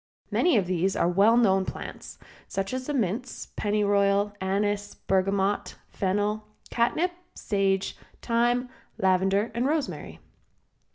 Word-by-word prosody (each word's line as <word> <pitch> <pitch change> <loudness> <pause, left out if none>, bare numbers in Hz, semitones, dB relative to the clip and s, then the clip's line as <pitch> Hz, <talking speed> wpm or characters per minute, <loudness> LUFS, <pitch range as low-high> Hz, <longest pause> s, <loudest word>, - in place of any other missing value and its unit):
Many 350 -8 +3
of 195 - +2
these 185 +1 0
are - - +2
well 200 +6 +4
known 195 -5 +4
plants, - - -7 0.3
such 195 +4 -3
as 255 0 -3
the 295 - -1
mints, 230 +1 -2
pennyroyal, 205 -1 +2
anise, 205 +2 -1
bergamot, 195 +1 0 0.2
fennel, 205 +2 -1 0.2
catnip, 310 +10 +1 0.2
sage, 195 -1 0 0.2
thyme, 240 +1 +1 0.3
lavender 190 +3 +2
and 240 +4 0
rosemary. 300 -2 -2
205 Hz, 115 wpm, -27 LUFS, 195-235 Hz, 0.3 s, well